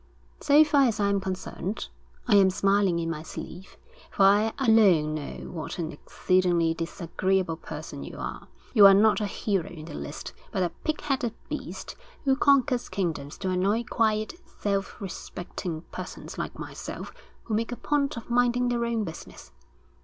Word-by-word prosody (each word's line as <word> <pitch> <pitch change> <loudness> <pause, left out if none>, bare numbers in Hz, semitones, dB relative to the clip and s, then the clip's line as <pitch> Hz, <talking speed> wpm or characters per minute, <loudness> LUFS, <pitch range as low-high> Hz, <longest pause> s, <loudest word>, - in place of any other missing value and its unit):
So 290 +2 +6
far 295 -3 +4
as 220 -3 -1
I 200 -1 +2
am 200 0 +2
concerned, 190 +1 -4 0.4
I 235 - +3
am 195 -1 +7
smiling 195 -1 +2
in 165 -1 -1
my 165 -2 -3
sleeve; 175 +3 -9 0.3
for 195 - +1
I 205 +3 +5
alone 205 - +4
know 150 -2 -6
what 165 +1 -5
an 165 -2 -3
exceedingly 175 -3 +1
disagreeable 170 +1 -1
person - - -7
you - - -8
are. - - -6 0.3
You 205 -5 +9
are 195 - +8
not 215 +2 +4
a 210 - 0
hero 195 -2 -1
in 155 -3 -9
the 160 - -9
least, 145 - -6 0.2
but 190 - 0
a 175 - -1
pig 310 -1 -1
headed 265 -6 -1
beast - - -6 0.3
who 270 -1 +3
conquers 275 -3 +3
kingdoms 160 -7 -3
to 190 -1 -2
annoy 195 +5 +1
quiet, 215 -2 0
self 200 -1 -3
respecting 175 -3 -6
persons - - -7
like - - -5
myself - - -7 0.3
who 225 - -4
make 225 +3 0
a - - -2
point 280 0 0
of 230 - -7
minding 245 0 +3
their 240 -1 0
own 230 -2 0
business. 165 -5 -9
200 Hz, 170 wpm, -27 LUFS, 175-235 Hz, 0.4 s, You